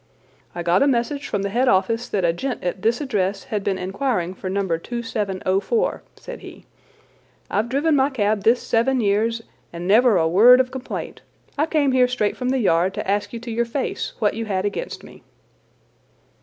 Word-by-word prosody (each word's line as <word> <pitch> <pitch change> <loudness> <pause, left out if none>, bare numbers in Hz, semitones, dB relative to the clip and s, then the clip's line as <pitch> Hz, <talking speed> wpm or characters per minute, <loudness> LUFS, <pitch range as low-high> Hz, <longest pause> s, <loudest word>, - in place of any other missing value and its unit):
"I 175 - -4
got 175 +2 +3
a 280 - +4
message 275 +2 -1
from 200 - -2
the 200 - -2
head 250 +4 +1
office 230 +4 +1
that 190 -3 0
a 165 - +2
gent 255 +8 -4
at 180 +1 -3
this 230 +5 +1
address 200 -7 -1
had 210 -2 -3
been 195 -1 -1
inquiring 190 -1 -2
for 190 0 -6
No. 195 +1 -1
2704," 210 - -2
said - - -9
he. - - -12 0.9
"I've 215 +4 0
driven 290 +4 +2
my 270 0 +3
cab 215 -5 0
this 230 +4 +3
seven 250 +3 +1
years 225 +2 +1 0.3
and 170 +1 -6
never 220 +1 +5
a 160 -1 +2
word 230 +9 +7
of 255 -1 +1
complaint. 260 -1 -6 0.3
I 300 +2 +1
came 300 -4 +2
here 255 -1 +4
straight 245 -4 -1
from 250 -1 -3
the 265 - +1
Yard 185 -5 +2
to - - -4
ask 205 +1 0
you 235 - -6
to 235 0 -6
your 235 +1 +1
face 260 +4 -3
what 210 -3 +1
you 225 +1 -4
had 195 -2 -1
against 345 - -4
me." - - -14
225 Hz, 195 wpm, -22 LUFS, 195-255 Hz, 0.9 s, word